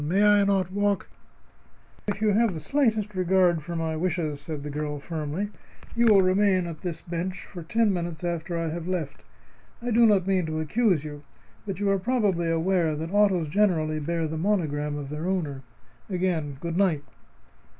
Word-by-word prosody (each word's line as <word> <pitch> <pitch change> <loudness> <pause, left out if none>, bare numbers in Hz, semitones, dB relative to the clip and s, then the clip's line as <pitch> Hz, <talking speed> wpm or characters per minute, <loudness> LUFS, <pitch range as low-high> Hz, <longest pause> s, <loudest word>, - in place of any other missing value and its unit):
May 185 +7 +2
I 205 -1 +6
not 190 -2 +1
walk 205 0 0 0.5
" - - -31
"If 205 0 -2
you 215 - +3
have 220 -3 +2
the - - -4
slightest 220 - +1
regard 185 -2 +3
for 170 +3 -6
my 160 -1 -1
wishes," 155 -3 -2
said 145 0 -6
the 150 - -5
girl, 150 0 -3
firmly, 160 +6 -4 0.4
"you 235 0 +4
will 200 -3 +6
remain 185 -1 +3
at 165 -2 -6
this 170 -3 -5
bench 180 +2 -4
for 180 - -9
ten 215 +5 +1
minutes 170 -2 -4
after 170 0 -2
I 165 -1 -1
have 170 +1 -5
left. 175 -6 -3 0.6
I 240 +1 -3
do 235 +1 +6
not 200 -4 +3
mean 190 -3 +1
to 155 0 -2
accuse 180 0 +1
you, 145 -1 -7 0.5
but 195 -2 -4
you 205 - 0
are 195 - +2
probably 195 -6 +1
aware 165 -1 +1
that 160 +4 -5
autos 195 -6 +3
generally 155 -4 +1
bear 165 +2 -1
the 155 0 -4
monogram 150 -6 0
of 140 -2 -6
their 150 +4 -4
owner. 155 -8 -2 0.5
Again, 175 -7 -1
good 170 +2 -3
night." 175 -7 +2
175 Hz, 185 wpm, -26 LUFS, 155-200 Hz, 0.6 s, I